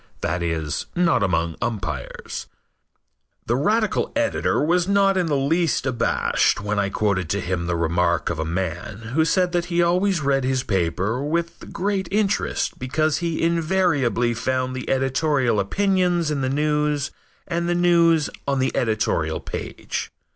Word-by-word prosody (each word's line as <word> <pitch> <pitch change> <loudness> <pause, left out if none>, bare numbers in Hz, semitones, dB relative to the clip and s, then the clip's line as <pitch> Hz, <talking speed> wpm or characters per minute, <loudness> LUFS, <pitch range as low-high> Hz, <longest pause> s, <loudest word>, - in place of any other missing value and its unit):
That 90 +2 -1
is, 80 -3 -2
not 175 -7 +3
among 85 -4 0
umpires. 95 -10 -4 1.0
The 120 - +1
radical 210 - +1
editor 290 -1 +1
was 175 +2 +2
not 200 -1 +3
in 180 -2 +1
the 145 -3 +1
least 155 +1 +1
abashed 120 -3 +1
when 105 0 -1
I 100 -1 +1
quoted 95 -5 0
to 100 - 0
him 90 -2 -2
the 85 - 0
remark 85 +1 +1
of 80 - -4
a - - 0
man 95 +6 -4
who 160 +3 +3
said 180 +2 +2
that 175 -1 0
he 175 -1 +1
always 180 0 +2
read 135 -1 +1
his 130 0 0
paper 95 +6 -1
with 170 +3 -3
great 195 0 -1
interest 205 -1 0
because 145 +3 0
he 170 -2 -2
invariably 160 - +1
found 130 +2 -1
the 130 - -5
editorial 135 -3 +1
opinions 180 - +1
in 145 -2 -1
the 130 - 0
news 150 0 0 0.4
and 170 0 -1
the 175 - +1
news 170 -3 +4 0.2
on 140 -1 +1
the 130 0 0
editorial 110 -9 0
page. - - -5
140 Hz, 155 wpm, -23 LUFS, 105-170 Hz, 1.0 s, news